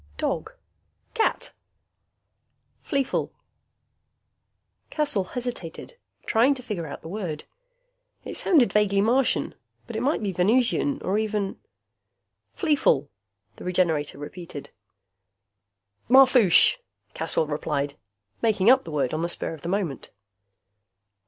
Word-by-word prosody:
"Dog?" 440 - -3 0.6
"Cat." 450 -2 -1 1.3
"Fleefl?" 275 -3 -1 1.6
Caswell 285 -11 0
hesitated, 245 - -6 0.3
trying 245 +5 +3
to 255 - -10
figure 195 -9 -5
out 140 - -9
the - - -8
word. 175 -5 -5 0.8
It - - -6
sounded 300 -10 +3
vaguely 205 -2 +2
Martian, 240 +5 +1 0.3
but 235 - -9
it 220 - -2
might 270 -2 0
be 200 - -1
Venusian 240 +9 +1
or 200 +3 0
even 210 -2 -2 1.0
"Fleefl?" 285 - +2 0.5
the - - -10
Regenerator 170 -6 0
repeated. 145 0 -9 1.4
"Marfoosh," 255 - +7 0.4
Caswell - - +1
replied, 145 -1 -3 0.5
making 220 -1 +4
up 265 0 +3
the 165 - -8
word 140 -4 -1
on 155 - -2
the 170 - -1
spur 170 - -2
of 160 - -11
the 170 - -5
moment. 180 -8 -3
205 Hz, 110 wpm, -25 LUFS, 165-255 Hz, 1.6 s, Marfoosh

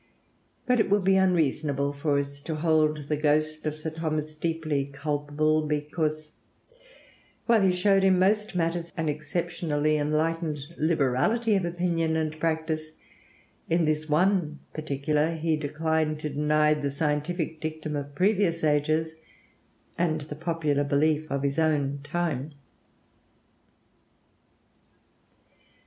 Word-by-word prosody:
But 250 -1 +2
it 220 - +2
would 205 0 +3
be 190 +1 +4
unreasonable 150 -6 +1
for 145 0 0
us 140 0 -3
to 155 +2 -4
hold 155 -1 +2
the 150 +2 -1
ghost 155 +1 0
of 150 - -2
Sir 155 +1 -5
Thomas 155 -1 -3
deeply 155 -3 -1
culpable 150 +2 0
because, 150 +1 -2 1.1
while 230 -3 +4
he 190 -1 +4
showed 195 +2 +3
in 190 -1 +5
most 210 +2 +2
matters 170 0 -1
an 160 -1 0
exceptionally 155 0 -1
enlightened 155 +1 0 0.2
liberality 160 - +1
of 190 -3 +1
opinion 170 -2 0
and 155 -1 -2
practice, 160 -1 -2 0.8
in 170 +1 +3
this 155 0 -1
one 165 -1 +2 0.2
particular 150 +1 0
he 160 0 0
declined 155 +1 -1
to 150 - -3
deny 150 +1 +3
the 145 -2 -2
scientific 155 +3 -2
dictum 155 -1 -4
of 145 0 -5
previous 185 -2 +2
ages 155 +2 +1 0.9
and 160 -3 +1
the 150 0 -7
popular 155 -3 0
belief 150 +2 +1
of 140 0 -2
his 140 +2 0
own 145 -3 +1
time. 150 -2 -2
155 Hz, 125 wpm, -27 LUFS, 150-165 Hz, 1.1 s, in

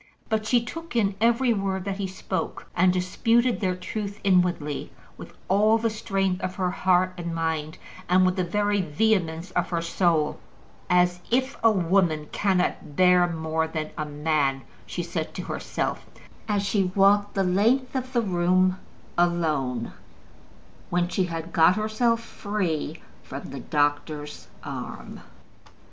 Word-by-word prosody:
But 215 -1 0
she 240 0 +2
took 330 +1 -8
in 205 -4 +2
every 235 +2 +3
word 195 -2 -2
that 195 -1 -3
he 200 -1 -2
spoke, 190 0 -4
and 180 +1 +4
disputed 230 +7 +1
their 185 -3 0
truth 205 +2 -5
inwardly 175 -6 +1 0.2
with - - -10 0.2
all 210 +4 +4
the 225 0 0
strength 195 -4 -1
of 185 - -3
her 180 -2 0
heart 185 0 +2
and 170 -1 -4
mind, 160 -1 -2 0.3
and 185 +1 +5
with 185 0 +2
the 185 - 0
very 205 +3 +1
vehemence 170 0 0
of - - -1
her 170 -2 -1
soul. 170 -3 +1 0.5
"As 180 0 +3
if 260 +2 +1
a 225 - +7
woman 175 -5 +1
cannot 180 -6 0
bear 180 0 +5
more 160 -1 -1
than 155 -1 -4
a 155 - -2
man!" 145 -2 0 0.2
she - - -3
said - - -4
to - - -4
herself, - - -3 0.4
as 205 -2 +1
she 195 -2 +1
walked 205 +1 +4
the 195 - +2
length 230 +9 +2
of 255 0 -3
the 240 -2 +1
room 185 0 +2 0.4
alone, 155 -9 0 1.0
when 175 0 +1
she 185 0 0
had 165 -1 -6
got 165 +3 +5
herself 225 +2 +1
free 185 -8 -3 0.2
from 140 +1 -8
the 140 - -6
doctor's 145 +1 -1 0.2
arm. - - -7
185 Hz, 150 wpm, -25 LUFS, 165-205 Hz, 1.0 s, a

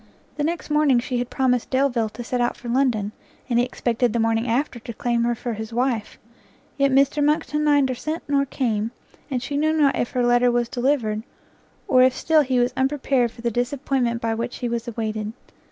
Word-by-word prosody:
The 295 - -2
next 330 0 -3
morning 300 -4 +4
she 245 0 -1
had 245 - -3
promised 250 -3 0
Delvile 260 -4 +1
to 240 - -6
set 245 +1 -2
out 240 - 0
for 240 - -10
London, 235 -5 +1 0.4
and 240 -2 +2
he 245 - +3
expected 240 -2 -1
the 235 - 0
morning 225 +1 +1
after 245 +1 -1
to 235 - -8
claim 235 +1 0
her 240 0 +1
for 235 +1 -4
his 220 +1 -6
wife; 240 -2 -1 0.6
yet 275 -1 +2
Mr 275 +2 +3
Monckton 300 0 +1
neither 285 -3 +3
sent 310 +6 -4
nor 280 -1 +2
came, 225 -5 -1 0.4
and 250 -3 -2
she 285 +2 -3
knew 310 +2 +2
not 295 -3 +3
if 240 - -1
her 250 -1 +1
letter 245 0 +4
was 240 -1 0
delivered, 240 -4 0 0.7
or 255 - +5
if 255 0 +4
still 315 +1 +3
he 260 -3 0
was 245 +1 +1
unprepared 265 -2 +1
for 230 - -14
the 235 - 0
disappointment 245 0 -1
by 225 -1 0
which 235 +2 -4
he 245 - -3
was 235 0 -3
awaited. 215 -2 -3
245 Hz, 205 wpm, -23 LUFS, 235-275 Hz, 0.7 s, or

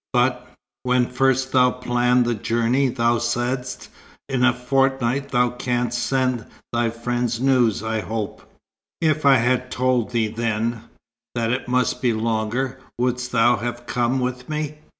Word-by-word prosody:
"But - - +1 0.3
when 125 0 +2
first 130 +1 +1
thou 125 -1 +5
planned 125 0 +1
the 120 - +1
journey, 115 +5 +1
thou 120 -1 +1
saidst; 120 +2 -2 0.4
'In 130 -2 0
a 130 - +6
fortnight 135 +1 0
thou 125 -2 +2
canst 125 -1 -1
send 130 -4 0 0.3
thy 120 -1 +1
friends 120 0 -2
news, 125 -5 +2
I 110 0 -1
hope.'" 110 -2 -4 0.6
"If 155 -2 +1
I 135 - +8
had 125 +1 +1
told 125 -3 +1
thee 115 -3 0
then, 115 0 -2 0.5
that 115 -1 0
it 125 +1 -2
must 125 0 0
be 125 -3 +2
longer, 115 +4 -1 0.2
wouldst 125 0 -1
thou 120 0 +4
have 120 +2 -5
come 120 +2 0
with 125 +1 -3
me? 150 0 -3
125 Hz, 150 wpm, -22 LUFS, 120-130 Hz, 0.6 s, I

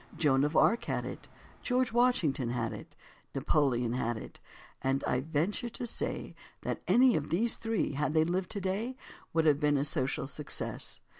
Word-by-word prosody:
Joan 135 -3 +3
of 150 +2 +1
Arc 230 - +4
had - - -2
it, - - -7 0.3
George 250 -1 +1
Washington 180 - +2
had 120 -2 -1
it, - - -10 0.4
Napoleon 135 -4 +1
had 120 -2 -1
it—and 135 +4 -5
I 125 - +1
venture 160 - -1
to 240 - -5
say 235 - -3 0.3
that - - -3
any 250 0 +6
of 150 -1 -2
these 225 +8 +2
three, 225 -8 -1
had 150 +2 -1
they 155 0 +5
lived 180 +2 -1
today, 205 +6 -2 0.4
Would 160 0 +2
have 145 -2 +4
been 145 -1 +3
a 140 - +1
social 135 -4 0
success. 145 +1 -4
155 Hz, 165 wpm, -31 LUFS, 135-220 Hz, 0.4 s, any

